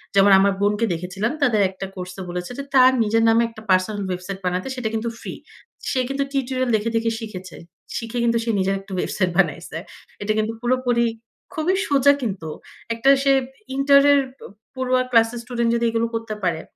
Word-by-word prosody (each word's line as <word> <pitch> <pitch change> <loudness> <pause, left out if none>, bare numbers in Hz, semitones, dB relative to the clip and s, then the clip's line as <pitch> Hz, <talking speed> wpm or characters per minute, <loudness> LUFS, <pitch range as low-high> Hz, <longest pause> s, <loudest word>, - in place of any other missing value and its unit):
যেমন 195 0 +6
আমার 200 0 +3
বোনকে 210 +3 +2
দেখেছিলাম 185 +7 -3
তাদের 220 -6 +3
একটা 190 +1 -7
কোর্সে 185 +1 -7
বলেছে 180 +4 -5
যে, - - -3
তার 255 0 +7
নিজের 225 +2 +2
নামে 230 +1 +4
একটা 220 -1 -13
পার্সোনাল 190 +3 +2
ওয়েবসাইট 185 +2 -5
বানাতে, 180 +5 -1
সেটা 245 -4 -2
কিন্তু 225 +1 -1
ফ্রি। - - -7 0.6
সে 260 - 0
কিন্তু 275 0 0
টিউটোরিয়াল 255 -2 -1
দেখে, 215 +2 0
দেখে 230 0 +1
শিখেছে। 190 -5 -8 0.4
শিখে 230 +1 -5
কিন্তু 235 0 +2
সে 230 - -3
নিজের 195 +1 +1
একটা 195 +1 -15
ওয়েবসাইট 180 0 0
বানাইছে। 165 -2 0 0.4
এটা 215 +1 0
কিন্তু 215 +1 0
পুরোপুরি 245 -1 +1 0.5
খুবই 345 +3 0
সোজা 280 0 +5
কিন্তু। 190 -9 -4 0.4
একটা 235 +4 +2
সে 275 - +4 0.4
ইন্টার 280 +1 +5
এর 280 - +5 0.2
প - - -28 0.3
পড়ুয়া 255 -1 +1
ক্লাস 230 -1 +5
এর 240 - -5
স্টুডেন্ট 235 -1 -1
যদি 235 0 +1
এগুলো 230 0 0
করতে 225 -1 -4
পারে, 165 -3 0
225 Hz, 185 wpm, -22 LUFS, 195-250 Hz, 0.6 s, তার